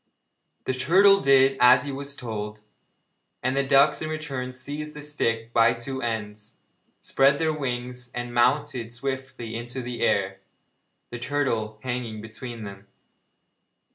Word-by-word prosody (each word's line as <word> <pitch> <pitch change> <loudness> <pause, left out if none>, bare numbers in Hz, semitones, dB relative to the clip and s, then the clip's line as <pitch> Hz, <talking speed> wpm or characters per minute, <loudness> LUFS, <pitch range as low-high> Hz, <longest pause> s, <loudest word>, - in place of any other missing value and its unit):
The 130 - -1
turtle 190 +10 +5
did 135 0 +5
as 125 +2 +7
he 145 - -4
was 140 +1 -4
told, 105 -4 -6 0.8
and 130 +1 0
the 140 - +3
ducks 140 +2 +4
in 155 - -3
their 155 - -2
turn 135 -5 -5
seized 145 +4 -5
the 150 - -8
stick 115 -6 -2
by 115 0 +5
the 120 - -10
two 130 +2 -4
ends, 105 -2 -5 0.5
spread 140 +1 +3
their 160 0 +1
wings 125 -3 -4
and 120 0 -4
mounted 125 -1 +1
swiftly 130 -2 -5
into 120 +3 -5
the 120 0 -6
air, 95 -1 +1 0.7
the 120 - -6
turtle 120 -5 -1
hanging 120 -4 -4
between 110 +1 -8
them. 100 -1 -10
125 Hz, 145 wpm, -25 LUFS, 115-140 Hz, 0.8 s, as